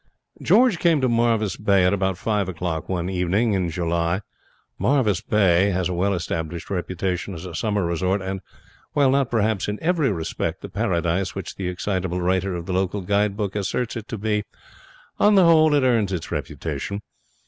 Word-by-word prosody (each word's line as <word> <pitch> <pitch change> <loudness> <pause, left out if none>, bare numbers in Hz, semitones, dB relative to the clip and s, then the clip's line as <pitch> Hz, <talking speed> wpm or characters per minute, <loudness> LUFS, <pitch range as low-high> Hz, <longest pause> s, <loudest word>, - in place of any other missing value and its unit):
George 240 -7 +4
came 165 -3 +3
to 130 - +2
Marvis 115 -4 +1
Bay 100 -3 +3
at 90 - +3
about 95 -2 0
five 105 -2 -1
o'clock 85 -2 -4
one 90 -2 -1
evening 95 +5 +1
in 90 -3 0
July. 85 +2 -1 0.6
Marvis 120 -9 +2
Bay 95 -2 +3
has 90 -2 0
a - - -2
well 95 +3 +1
established 85 0 -4
reputation 95 0 -2
as 80 - -8
a 90 - -7
summer 105 +1 0
resort, 90 +3 0
and, 95 0 -4 0.5
while 140 -3 +4
not 135 -2 +2
perhaps 110 -3 0
in 105 0 -2
every 160 -7 +1
respect 80 -4 -3
the - - -6
paradise 90 -3 -1
which 95 -3 -5
the 95 - -4
excitable 90 -1 -2
writer 95 +1 0
of 85 -1 -5
the 95 - -3
local 95 +2 0
guide 100 +2 +1
book 105 -2 -2
asserts 105 +4 -2
it 110 -2 -6
to 110 - -5
be, 105 0 0 0.8
on 210 0 +5
the 190 -2 +6
whole 155 -2 +6
it 145 - +3
earns 115 -6 +2
its 90 -4 -4
reputation. 100 +1 -4
95 Hz, 180 wpm, -23 LUFS, 90-110 Hz, 0.8 s, the